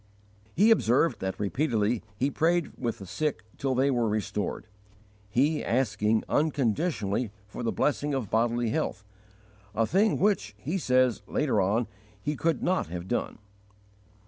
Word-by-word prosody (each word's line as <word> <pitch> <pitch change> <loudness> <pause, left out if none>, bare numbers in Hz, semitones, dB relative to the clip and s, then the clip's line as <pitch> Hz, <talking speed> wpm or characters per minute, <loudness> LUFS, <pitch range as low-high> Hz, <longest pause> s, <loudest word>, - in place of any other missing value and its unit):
He 210 +6 +5
observed 165 - +3
that 95 0 -3
repeatedly 110 0 0 0.2
he 135 +5 +1
prayed 170 +2 +1
with 120 -3 -3
the 100 - -9
sick 145 - -2 0.2
till 135 -1 0
they 135 +2 +3
were 120 -3 +1
restored, 105 -1 -2 0.6
he 145 +8 +2
asking 110 -3 +1
unconditionally 130 - 0
for 105 - -8
the 115 - 0
blessing 145 0 0
of 120 -7 -3
bodily 115 +1 +1
health, 115 -7 -2 0.7
a 115 - +3
thing 200 - +2
which, 190 - +1
he 155 - -2
says, 130 -5 +2
later 130 -9 +1
on, 105 +6 +1 0.3
he 150 +8 -2
could 165 +2 0
not 185 - +1
have 85 +2 -6
done. 120 - -2
125 Hz, 145 wpm, -28 LUFS, 105-150 Hz, 0.7 s, He